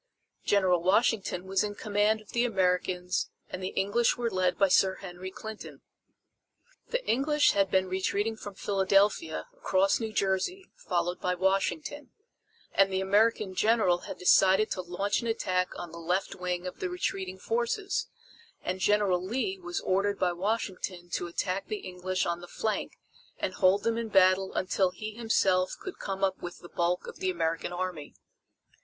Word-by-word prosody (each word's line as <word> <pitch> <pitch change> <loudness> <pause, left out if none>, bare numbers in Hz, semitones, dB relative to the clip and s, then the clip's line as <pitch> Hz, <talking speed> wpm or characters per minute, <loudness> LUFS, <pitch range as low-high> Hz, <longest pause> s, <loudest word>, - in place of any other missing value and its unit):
General 185 -4 +3
Washington 190 -1 +2
was 190 +1 +1
in 205 -1 -3
command 210 +1 +1
of 215 - -20
the 235 - +1
Americans 180 -4 0 0.2
and 185 - -6
the 185 - -2
English 205 +5 +1
were 235 -1 -1
led 185 -1 +1
by 195 - +4
Sir 190 0 +4
Henry 185 0 -8
Clinton. 220 +3 -9 1.0
The - - -2
English 295 +4 +3
had 195 -1 +2
been 190 0 +2
retreating 200 +4 -1
from 205 -2 -9
Philadelphia, 195 -4 +1
across 190 +1 +2
New 225 -2 -3
Jersey, 215 - -1
followed 175 0 -2
by 180 0 0
Washington, 195 - -1 0.6
and 195 0 +4
the 190 - 0
American 205 +1 +2
general 210 -3 +3
had - - -8
decided 190 +3 +4
to 185 - -1
launch 180 +5 -1
an 235 - -4
attack 185 -5 0
on 175 -2 -7
the 170 - -9
left 180 +3 -1
wing 180 0 -3
of 180 - -6
the 380 -1 -2
retreating 195 - -3
forces 240 - -1 0.6
and 185 +1 -2
General 200 -3 +2
Lee 265 - -2
was 345 -1 -4
ordered 200 +2 +1
by 180 -1 +1
Washington 185 -2 -3
to 175 - -2
attack 185 +2 -2
the 215 - -2
English 185 0 -2
on 170 0 -2
the 175 - -9
flank 215 +4 -2 0.4
and 185 - -2
hold 190 +3 +3
them 230 0 +1
in 230 - -3
battle 190 -1 +4
until 190 0 +1
he 215 +4 -7
himself 195 -5 +2
could 380 - -8
come 195 -1 -4
up 190 -1 +1
with 175 0 -6
the 175 - -13
bulk 175 +1 0
of - - -9
the 185 - 0
American 165 -1 -1
Army. 175 -4 -4
190 Hz, 165 wpm, -29 LUFS, 180-215 Hz, 1.0 s, by